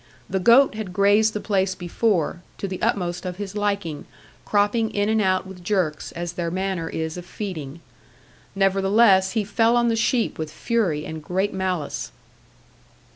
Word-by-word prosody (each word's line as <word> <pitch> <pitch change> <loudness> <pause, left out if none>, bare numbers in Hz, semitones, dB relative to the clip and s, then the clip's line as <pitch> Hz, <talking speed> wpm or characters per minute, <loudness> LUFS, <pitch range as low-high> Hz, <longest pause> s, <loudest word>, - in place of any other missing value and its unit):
The 190 - -1
goat 240 +8 +6
had 215 -4 -6
grazed 205 +3 +4
the 210 - -2
place 190 -3 0
before, 175 -2 0 0.2
to 200 - -3
the 185 -1 -6
utmost 175 -2 -1
of 180 -1 -4
his 200 0 -6
liking, 200 -7 -2 0.4
cropping 210 +2 +2
in 205 +1 +1
and 220 0 +2
out 185 -1 +1
with 190 -2 -11
jerks, 175 -6 -1
as 175 0 -4
their 175 -1 -2
manner 185 -2 -2
is 160 +1 -4
of 175 - -7
feeding. 165 -8 -6 0.7
Nevertheless 195 0 +4
he 220 -2 +1
fell 225 +3 +2
on 235 0 +3
the 230 - +1
sheep 230 -2 0
with 155 -1 -4
fury 175 -6 -1
and 160 -1 -7
great 190 +5 -1
malice. 185 -5 -3
190 Hz, 165 wpm, -23 LUFS, 175-210 Hz, 0.7 s, goat